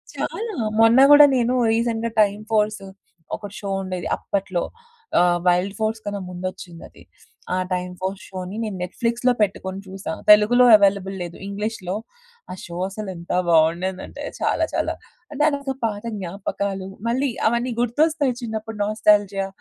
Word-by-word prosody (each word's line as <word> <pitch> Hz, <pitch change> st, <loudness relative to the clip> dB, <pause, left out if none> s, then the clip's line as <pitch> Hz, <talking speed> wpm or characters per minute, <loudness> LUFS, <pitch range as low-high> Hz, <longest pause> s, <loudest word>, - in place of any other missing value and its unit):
చాలా 445 Hz, 0 st, -4 dB, 0.3 s
మొన్న 230 Hz, +3 st, +6 dB
గూడా 290 Hz, 0 st, +10 dB
నేను 245 Hz, +1 st, +1 dB, 0.2 s
రీసెంట్‌గా 230 Hz, 0 st, -1 dB
టైమ్ 205 Hz, 0 st, +1 dB
ఫోర్స్ 210 Hz, -2 st, +1 dB, 0.5 s
ఒకటి 205 Hz, -1 st, -9 dB
షో 200 Hz, -, -5 dB
ఉండేది 185 Hz, -2 st, -4 dB
అప్పట్లో. 190 Hz, -3 st, -2 dB, 0.6 s
ఆహ్, 175 Hz, 0 st, +3 dB
వైల్డ్ 180 Hz, +3 st, +2 dB
ఫోర్స్ 220 Hz, +1 st, -1 dB
కన్నా 205 Hz, 0 st, -3 dB
ముందొచ్చిందది. 180 Hz, -1 st, -8 dB, 0.5 s
ఆ -, -, 0 dB, 0.2 s
టైమ్ 180 Hz, 0 st, -3 dB
ఫోర్స్ 190 Hz, +1 st, -4 dB
షోని 185 Hz, +1 st, -6 dB
నేను 205 Hz, -4 st, -4 dB
నెట్‌ఫ్లిక్స్‌లో 235 Hz, +6 st, 0 dB
పెట్టుకొని 190 Hz, -1 st, -1 dB
చూసా. 190 Hz, -3 st, -6 dB, 0.2 s
తెలుగులో 230 Hz, +4 st, +6 dB
అవైలబుల్ 195 Hz, -1 st, +1 dB
లేదు. 170 Hz, 0 st, -8 dB
ఇంగ్లీష్‌లో 200 Hz, -2 st, -4 dB, 0.6 s
ఆ -, -, -5 dB
షో 170 Hz, 0 st, -8 dB
అసలు 205 Hz, 0 st, -6 dB
ఎంత 170 Hz, +1 st, -8 dB, 0.2 s
బావుండేదంటే 170 Hz, +4 st, +1 dB, 0.2 s
చాలా -, -, +1 dB
చాలా. -, -, -1 dB, 0.4 s
అంటే 295 Hz, +1 st, -1 dB
అంత 280 Hz, -1 st, -4 dB, 0.2 s
పాత 210 Hz, -1 st, -3 dB, 0.2 s
జ్ఞాపకాలు 195 Hz, +1 st, -4 dB, 0.2 s
మళ్ళీ 265 Hz, +3 st, +1 dB, 0.2 s
అవన్నీ 235 Hz, +1 st, -1 dB
గుర్తొస్తాయి. 285 Hz, +1 st, +1 dB
చిన్నప్పుడు 220 Hz, -1 st, -5 dB
నాస్టాల్జియా 205 Hz, -2 st, +2 dB
205 Hz, 135 wpm, -22 LUFS, 185-230 Hz, 0.6 s, గూడా